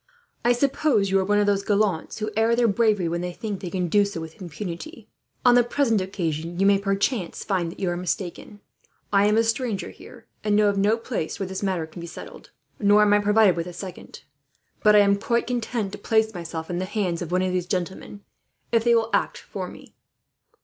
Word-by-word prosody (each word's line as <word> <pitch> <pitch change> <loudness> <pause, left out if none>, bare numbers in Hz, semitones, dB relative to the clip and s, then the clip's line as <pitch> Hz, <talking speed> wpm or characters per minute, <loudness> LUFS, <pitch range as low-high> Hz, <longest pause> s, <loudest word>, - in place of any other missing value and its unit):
I 240 - +4
suppose 245 -5 +1
you 195 - +4
are - - +1
one 205 +2 +1
of 205 - +3
those 200 -1 +2
gallants 200 -5 0
who 215 0 -3
air 225 +2 +3
their 240 0 +3
bravery 210 -4 +2
when 170 +1 -2
they 180 0 -3
think 205 +2 -5
they 180 - -5
can 180 0 -1
do 205 +4 +4
so, 200 -4 -4
with 160 +3 -9
impunity. 180 - -7 0.4
On 245 - +7
the 245 0 +6
present 240 -4 +1
occasion 170 -3 -3
you 195 - +3
may, 200 0 +5
perchance, 195 0 -1
find 180 -4 -1
that - - -13
you 190 - -1
are - - -2
mistaken. 185 +3 -4 0.5
I 200 +1 +5
am 210 +1 +3
a 225 - +4
stranger 225 -2 -2
here, - - -14 0.2
and 210 -1 +2
know 210 0 +4
of 200 - -1
no 210 +3 +3
place 230 -8 -4
where 195 - -1
this 190 +1 -5
matter 185 -5 -1
can 160 +2 -12
be 170 - -7
settled, - - -11 0.3
nor 205 0 +5
am 205 -1 +4
I 205 - +5
provided 210 -2 +4
with 170 0 -3
a 180 - -7
second; 180 0 -9 0.6
but 210 0 +5
I 205 - +8
am 200 0 +3
quite 235 +3 0
content 235 -4 -2
to 205 - -8
place 220 +1 +1
myself 170 -2 -6
in 175 - -2
the 185 - -2
hands 185 -4 -2
of 175 -1 -5
one 180 +1 +2
of 185 - 0
these 180 -1 -1
gentlemen, 190 +2 -4 0.5
if 230 -1 +3
they 235 0 +4
will 230 0 +1
act - - +1
for - - -6
me." - - -13
200 Hz, 225 wpm, -24 LUFS, 180-220 Hz, 0.6 s, I